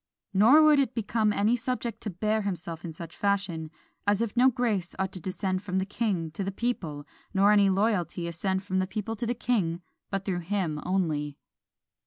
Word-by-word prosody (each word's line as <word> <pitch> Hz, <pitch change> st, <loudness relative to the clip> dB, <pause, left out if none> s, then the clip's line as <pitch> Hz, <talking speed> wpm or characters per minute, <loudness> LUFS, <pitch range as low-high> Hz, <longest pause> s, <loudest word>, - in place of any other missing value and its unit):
Nor 235 Hz, +11 st, +7 dB
would 305 Hz, -2 st, +6 dB
it 260 Hz, -3 st, +1 dB
become 220 Hz, -1 st, +1 dB
any 210 Hz, +3 st, +2 dB
subject 235 Hz, -2 st, -3 dB
to 215 Hz, -, -3 dB
bear 215 Hz, +4 st, 0 dB
himself 175 Hz, -4 st, -4 dB
in 170 Hz, -, -5 dB
such 165 Hz, +1 st, -9 dB
a -, -, -21 dB
fashion, 195 Hz, -6 st, 0 dB, 0.4 s
as 205 Hz, 0 st, +3 dB
if 230 Hz, -1 st, -2 dB
no 250 Hz, +2 st, +6 dB
grace 220 Hz, -8 st, -1 dB
ought 190 Hz, 0 st, -1 dB
to 185 Hz, -, -4 dB
descend 185 Hz, +1 st, -2 dB
from 190 Hz, -2 st, -3 dB
the 190 Hz, -, +1 dB
king 195 Hz, -6 st, -1 dB
to 175 Hz, +6 st, -4 dB
the 195 Hz, -, -2 dB
people, 185 Hz, -10 st, -3 dB, 0.3 s
nor 200 Hz, +2 st, +5 dB
any 200 Hz, -2 st, +5 dB
loyalty 190 Hz, -4 st, 0 dB
ascend 190 Hz, +3 st, -2 dB
from 190 Hz, -1 st, -1 dB
the 185 Hz, -, 0 dB
people 215 Hz, +2 st, -3 dB
to 230 Hz, +2 st, -3 dB
the 240 Hz, -, 0 dB
king, 185 Hz, -8 st, 0 dB, 0.3 s
but 195 Hz, -1 st, -3 dB
through 185 Hz, -3 st, -1 dB
him 170 Hz, -4 st, -2 dB
only." 155 Hz, -6 st, 0 dB
195 Hz, 200 wpm, -28 LUFS, 175-220 Hz, 0.4 s, Nor